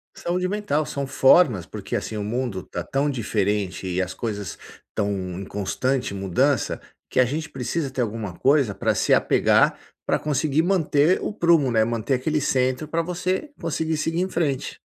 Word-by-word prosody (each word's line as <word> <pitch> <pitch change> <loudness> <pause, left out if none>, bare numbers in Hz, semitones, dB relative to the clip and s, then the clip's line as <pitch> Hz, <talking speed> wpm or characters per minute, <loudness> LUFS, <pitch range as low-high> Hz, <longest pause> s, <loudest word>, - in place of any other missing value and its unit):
Saúde 180 +1 -1
mental, 185 -7 -1
são 140 -1 -3
formas, 130 - +4
porque - - -6
assim, 110 - -3
o 105 - -2
mundo 110 -3 -2
tá - - -5
tão 140 +2 0
diferente 105 -6 -1
e 90 0 0
as 90 0 -3
coisas 105 -5 -4 0.3
estão 100 -1 -1 0.3
em 100 - -6
constante 125 +5 -1
mudança, 100 +9 0 0.3
que - - 0
a 130 - +6
gente 155 +6 -3
precisa 135 +2 -3
ter 130 - -2
alguma 110 -4 -3
coisa 135 -6 +3
pra - - 0
se - - +2
apegar, - - +3 0.3
pra - - +3
conseguir 150 +1 +1
manter 170 -3 +2
o - - -2
prumo, 170 - +3
né, 110 -1 +4
manter 115 +3 0
aquele 150 +4 0
centro 130 +2 0
pra 165 +2 0
você 180 - -2
conseguir 160 -1 -1
seguir 165 +3 -1
em 185 - -1
frente. 150 -7 -2
135 Hz, 175 wpm, -24 LUFS, 110-160 Hz, 0.3 s, a